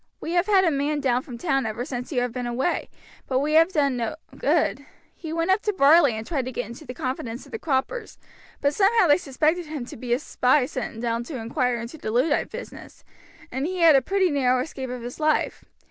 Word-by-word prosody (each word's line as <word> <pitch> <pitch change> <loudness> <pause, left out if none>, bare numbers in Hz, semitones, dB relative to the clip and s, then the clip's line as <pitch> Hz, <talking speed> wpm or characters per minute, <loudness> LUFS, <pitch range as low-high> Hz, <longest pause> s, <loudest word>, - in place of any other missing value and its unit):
"We 330 - -5
have 350 +2 +2
had 390 -3 +5
a 335 - +3
man 290 +1 0
down 255 -3 +1
from 250 -2 -9
town 270 -4 0
ever 230 +3 -4
since 250 -2 -5
you 250 -4 +1
have 245 -1 -1
been 245 0 -3
away, 255 +8 -1 0.4
but 260 - 0
we 295 +3 0
have 330 +3 +5
done 280 -6 +1
no 235 +4 -2 0.2
good. - - +1 0.3
He 320 - -8
went 330 +3 +1
up 380 - +3
to 420 - -1
Varley 290 - +6
and 220 0 -5
tried 275 -4 -2
to 255 - -4
get 245 - -3
into 235 +8 -10
the 250 - -7
confidence 255 -3 -4
of - - -16
the 455 - -5
croppers, 330 - -2 0.4
but 285 +1 +2
somehow 420 +3 +4
they 290 -3 +5
suspected 315 +2 0
him 300 -5 -5
to - - -10
be 240 +1 -6
a 240 - +4
spy 255 -1 +2
sent 245 -3 -5
down 230 0 -1
to 275 +1 -6
inquire 240 +1 -1
into 235 +7 -8
the - - -4
Luddite 255 +7 +1
business, - - -10 0.5
and 265 +4 -2
he 370 0 -3
had 325 -3 +7
a 270 - +5
pretty 385 0 +1
narrow 255 -3 +2
escape 265 -2 -6
of 250 -1 -6
his 245 +5 -7
life. 310 0 0
275 Hz, 235 wpm, -24 LUFS, 245-325 Hz, 0.5 s, had